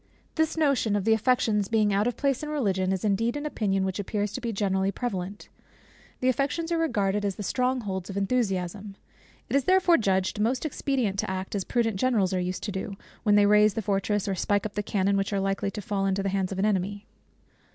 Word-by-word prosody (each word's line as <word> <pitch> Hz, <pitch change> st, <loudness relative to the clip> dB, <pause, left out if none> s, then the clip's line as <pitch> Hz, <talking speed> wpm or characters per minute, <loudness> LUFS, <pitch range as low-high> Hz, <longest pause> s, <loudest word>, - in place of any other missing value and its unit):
This 320 Hz, 0 st, 0 dB
notion 275 Hz, -9 st, +2 dB
of 205 Hz, -1 st, -1 dB
the 225 Hz, -, +5 dB
affections 220 Hz, -3 st, +2 dB
being 215 Hz, -2 st, +2 dB
out 205 Hz, +3 st, +2 dB
of 245 Hz, -, -2 dB
place 275 Hz, -3 st, 0 dB
in 300 Hz, -, -5 dB
Religion, 195 Hz, -11 st, 0 dB
is 190 Hz, +1 st, -1 dB
indeed 225 Hz, +6 st, +1 dB
an 290 Hz, -, -5 dB
opinion 195 Hz, -9 st, 0 dB
which 190 Hz, +1 st, -3 dB
appears 205 Hz, +1 st, -2 dB
to 255 Hz, -, -4 dB
be 235 Hz, -1 st, -2 dB
generally 195 Hz, -2 st, 0 dB
prevalent. 200 Hz, -4 st, -4 dB, 0.7 s
The 255 Hz, -, +1 dB
affections 285 Hz, +6 st, 0 dB
are 335 Hz, -, +1 dB
regarded 205 Hz, -10 st, 0 dB
as 200 Hz, -2 st, -1 dB
the 205 Hz, -, -6 dB
strong 255 Hz, +4 st, 0 dB
holds 190 Hz, -3 st, -4 dB
of 195 Hz, -, -5 dB
enthusiasm. 195 Hz, -2 st, -1 dB, 0.5 s
It -, -, -2 dB
is 280 Hz, -2 st, +2 dB
therefore 370 Hz, -2 st, +5 dB
judged 190 Hz, -2 st, 0 dB
most 245 Hz, +7 st, 0 dB
expedient 255 Hz, -9 st, -1 dB
to -, -, -1 dB
act, 190 Hz, 0 st, -4 dB
as 200 Hz, -2 st, -1 dB
prudent 225 Hz, -3 st, 0 dB
generals 205 Hz, -5 st, +1 dB
are 185 Hz, -, +1 dB
used 180 Hz, +1 st, -3 dB
to 210 Hz, -, -3 dB
do, 195 Hz, +1 st, -5 dB, 0.2 s
when 210 Hz, -2 st, +3 dB
they 205 Hz, 0 st, +6 dB
raze 210 Hz, 0 st, +5 dB
the 225 Hz, -, -2 dB
fortress, 200 Hz, +1 st, 0 dB
or 195 Hz, -, 0 dB
spike 205 Hz, +2 st, 0 dB
up 210 Hz, -, -4 dB
the 210 Hz, -, -1 dB
cannon, 200 Hz, -1 st, +1 dB
which 195 Hz, +1 st, -1 dB
are 200 Hz, -, +1 dB
likely 195 Hz, +1 st, -1 dB
to 210 Hz, -, -6 dB
fall 195 Hz, 0 st, -1 dB
into 195 Hz, 0 st, 0 dB
the 195 Hz, -, 0 dB
hands 190 Hz, -1 st, -1 dB
of 190 Hz, -, -4 dB
an 195 Hz, -, +1 dB
enemy. 200 Hz, 0 st, -1 dB
205 Hz, 225 wpm, -27 LUFS, 195-240 Hz, 0.7 s, they